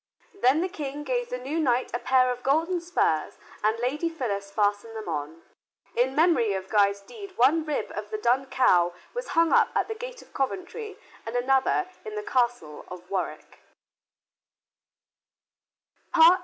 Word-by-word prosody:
Then 305 -5 +3
the 365 - 0
King 295 -5 -5
gave 245 -3 -1
the 250 - -3
new 275 +6 -3
knight 255 -4 +1
a 240 - 0
pair 255 -1 +3
of 250 0 -5
golden 330 +7 +1
spurs, 335 - 0 0.3
and 215 +2 +2
Lady 275 +8 -1
Phyllis 210 -11 -3
fastened 205 +2 0
them 220 -3 -6
on. 155 0 -4 0.5
In 255 +3 +1
memory 310 - +3
of 190 0 -5
Guy's 200 -2 +3
deed 400 - -11
one 295 +6 +4
rib 305 -2 -3
of - - -5
the 430 - -3
Dun 270 - +1
Cow 175 -10 +3 0.2
was - - -4
hung 330 -1 +5
up - - +6
at - - +1
the 445 - -3
gate - - -8
of - - -24
Coventry 375 - -3 0.3
and 225 +1 -6
another 265 +8 +2 0.2
in 430 - -7
the 425 - -3
Castle 240 - -1
of 180 0 -10
Warwick. 190 -2 -4
255 Hz, 160 wpm, -26 LUFS, 215-330 Hz, 0.5 s, up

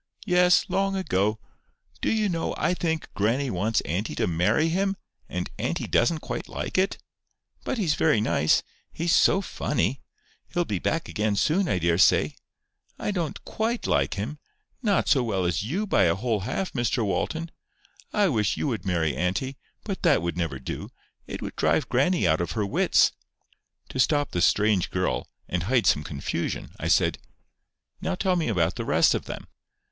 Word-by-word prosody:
"Yes, 180 -2 +4
long 195 +1 0
ago. 105 - 0 0.6
Do - - +1
you 215 -1 +2
know, 165 -3 -2
I - - +1
think 160 -3 -2
grannie 120 +6 0
wants 105 +5 +1
auntie 90 +9 -3
to - - +1
marry 90 - +2
him, 195 +3 0 0.3
and 90 0 -3
auntie - - -1
doesn't 155 +6 +2
quite - - -5
like - - -5
it? 190 +1 +2 0.7
But - - -2
he's 180 -9 +1
very 150 -8 +3
nice. 80 -8 +2 0.3
He's 165 +1 0
so 195 - +5
funny! 135 - -1 0.5
He'll 175 0 0
be 100 - -2
back 165 - -1
again 105 -1 0
soon, 165 - +2
I 95 - +1
daresay. 85 0 +3 0.6
I - - -2
don't 170 -7 -3
QUITE 225 +2 -2
like - - +1
him—not 150 - -3
so 135 - +4
well 95 -6 -1
as 85 -2 0
you 165 - -2
by 100 - +3
a 85 - +3
whole 110 +1 -1
half, 180 - -3
Mr 120 -2 0
Walton. 160 - -2 0.6
I 205 -2 +3
wish 110 - +1
you - - -1
would 115 -4 -3
marry 80 -5 +1
auntie; 95 - -1 0.3
but 195 -3 -4
that 160 - +3
would 85 - -2
never 85 -6 -2
do. 65 - -6 0.4
It - - -6
would - - -6
drive - - +1
grannie 140 - +2
out 80 +1 +2
of 85 - -2
her 105 -3 0
wits." 100 - +3 0.8
To 130 - -5
stop 145 +2 +2
the 90 - -1
strange 105 -1 +3
girl, - - -1 0.2
and 90 - -1
hide 115 +6 +1
some 75 - +3
confusion, 70 -1 -4
I - - -2
said: - - +3 0.8
"Now 185 - -1
tell 185 0 +1
me 170 -3 0
about 90 -6 +1
the - - -2
rest - - +4
of - - -2
them." - - -7
125 Hz, 175 wpm, -26 LUFS, -, 0.8 s, so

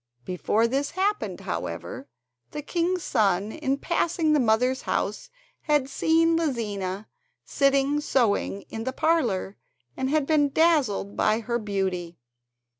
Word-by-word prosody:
Before 205 +5 +1
this 275 +4 -1
happened, 410 +2 -1
however, 270 - -5 0.4
the 295 - -6
king's 350 +2 -1
son 205 -3 +1
in 275 -2 -1
passing 330 0 0
the 300 - +4
mother's 250 +2 +2
house - - -2 0.3
had 295 -3 +1
seen 325 +4 +2
Lizina 210 - -2 0.4
sitting 275 +1 +2
sewing 220 -7 0
in 225 - -7
the 260 +2 -3
parlour, 260 - 0 0.4
and 260 - -2
had 300 -1 +2
been 290 -1 +3
dazzled 275 -11 +2
by 220 +2 +2
her 235 +1 -2
beauty. 190 -5 -3
265 Hz, 125 wpm, -25 LUFS, 215-310 Hz, 0.4 s, the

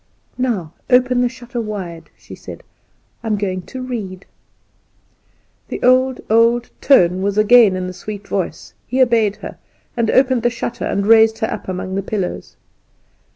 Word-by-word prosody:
"Now 205 -11 -2 0.2
open 250 -1 +3
the 245 - +2
shutter 240 0 -6
wide," 190 -6 -6
she - - -14
said; - - -10 0.6
"I - - -5
am 215 - +1
going 190 -2 -2
to 260 -1 -7
read." 200 -7 -6 1.4
The - - -5
old, 255 +1 +3
old 230 +2 +2
tone 185 -9 +4
was 200 +1 -1
again 215 -2 +6
in 185 0 -3
the 185 - -6
sweet 205 +2 -8
voice. 190 -3 -4
He 255 +3 -2
obeyed 230 -5 +3
her; - - -8 0.4
and 230 -2 0
opened 260 -1 +3
the 240 - +2
shutter, 240 0 -5
and 200 - -1
raised 220 0 +5
her 220 - -2
up - - -6
among 185 0 -4
the 195 - -1
pillows. 195 -2 -4
220 Hz, 160 wpm, -18 LUFS, 195-245 Hz, 1.4 s, again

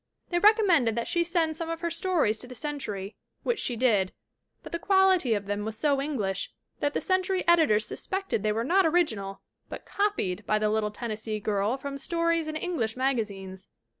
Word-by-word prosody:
They 345 - +2
recom 425 +3 +5
mended 265 - +3
that 235 - -2
she 345 -1 +2
send 335 -2 0
some 330 +1 -4
of 330 0 -4
her 340 -1 -1
stories 335 - +1
to 250 - -7
the 250 - -10
Cen 295 +2 -4
tury, 200 -5 -5 0.3
which 475 -3 0
she 245 - -1
did, 215 -6 +2 0.5
but - - -9
the 335 - -2
quality 375 - +4
of 205 -1 -3
them 205 +1 -2
was 220 0 -5
so 285 -3 +2
English 225 -10 -2 0.3
that 290 0 -1
the - - +2
Century 370 0 0
editors 310 -11 +4
suspected 385 - -3
they 215 0 +1
were 225 +2 -1
not 370 +9 +3
original 220 - 0 0.3
but - - -8
copied 310 - -1
by 215 - +3
the 215 0 +1
little 215 -1 +1
Tennessee 215 0 -4
girl 205 +3 0
from 275 +1 -6
stories 335 +1 0
in 310 - -4
English 310 -10 -2
magazines. 200 -8 -2
270 Hz, 195 wpm, -27 LUFS, 215-340 Hz, 0.5 s, recom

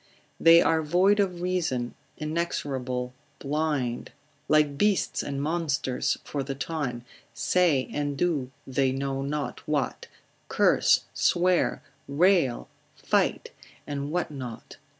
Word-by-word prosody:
They 165 +1 +7
are 160 -1 +2
void 180 +7 +3
of 180 -3 0
reason, 160 -10 -1 0.2
inexorable, 135 -6 -3 0.2
blind, 145 -4 -2 0.4
like 150 -2 +3
beasts 205 +5 +1
and 140 -1 -4
monsters 145 -4 -1
for 145 - -4
the 135 0 -4
time, 135 -5 -4 0.3
say 170 -8 +2
and 145 -1 -2
do 150 -7 0 0.2
they 135 0 +1
know 135 0 -2
not 145 +1 -3
what, 145 -3 -1 0.4
curse, - - +4
swear, 180 0 +2 0.2
rail, 160 -3 +2 0.3
fight, - - 0 0.3
and 145 0 -4
what 175 -2 -1
not? 125 -5 -8
145 Hz, 110 wpm, -27 LUFS, 135-170 Hz, 0.4 s, They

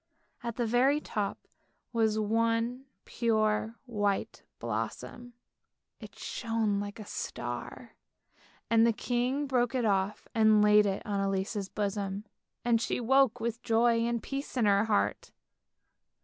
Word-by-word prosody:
At 235 -2 -4
the 240 - 0
very 255 +6 +3
top 210 -8 -3 0.6
was 220 -2 +2
one 230 +4 0 0.2
pure 220 -1 0
white 205 -5 -1 0.2
blossom, 120 - -5 0.7
it - - -12
shone 225 -3 -1
like 205 +2 -6
a 215 - -7
star, 120 - -6 0.7
and 225 0 +4
the 230 0 +4
king 250 +5 -1
broke 250 -2 +1
it 245 -3 +1
off 200 0 0
and 220 -2 +5
laid 210 0 +6
it 195 0 -2
on 200 -1 -1
Elise's 195 +1 -1
bosom, 200 0 -3 0.4
and 230 -2 +3
she - - -1
woke 255 0 +3
with 230 0 -3
joy 230 +1 +3
and 235 0 -1
peace 275 -1 -5
in 235 - +3
her 200 +1 +4
heart. 215 -2 0
225 Hz, 135 wpm, -30 LUFS, 205-240 Hz, 0.7 s, laid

